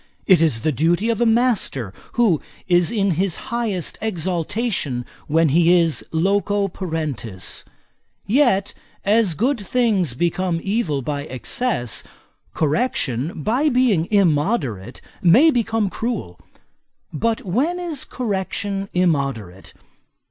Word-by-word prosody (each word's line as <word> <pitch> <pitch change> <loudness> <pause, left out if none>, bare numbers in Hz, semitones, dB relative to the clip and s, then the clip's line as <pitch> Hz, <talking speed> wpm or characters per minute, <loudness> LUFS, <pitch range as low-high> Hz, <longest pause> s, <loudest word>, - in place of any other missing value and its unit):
It 185 -4 +5
is 145 -9 +2
the 155 - +1
duty 170 - +1
of 230 - -2
a 240 - +4
master, 225 - +1 0.2
who 215 -10 +2 0.3
is 175 -2 +3
in 200 -4 +1
his 180 +1 0
highest 225 -7 -3
exaltation 180 - -2 0.2
when 160 +1 +3
he 170 +4 +4
is 165 -3 0
loco 200 +4 +1
parentis. 155 - -4 0.6
Yet, 210 -5 +2 0.3
as 205 -4 +3
good 250 - +1
things 205 - +1
become 175 +3 0
evil 190 - -1
by 145 +1 -3
excess, 130 - -1 0.5
correction, 150 - -1
by 260 +8 +2
being 240 - +2
immoderate, 145 - 0 0.2
may 245 - +6
become 225 -4 0
cruel. 205 - -4 0.7
But 225 +8 -1
when 275 - 0
is 330 -6 -3
correction 195 -3 -3
immoderate? 135 - -1
185 Hz, 110 wpm, -21 LUFS, 155-225 Hz, 0.7 s, may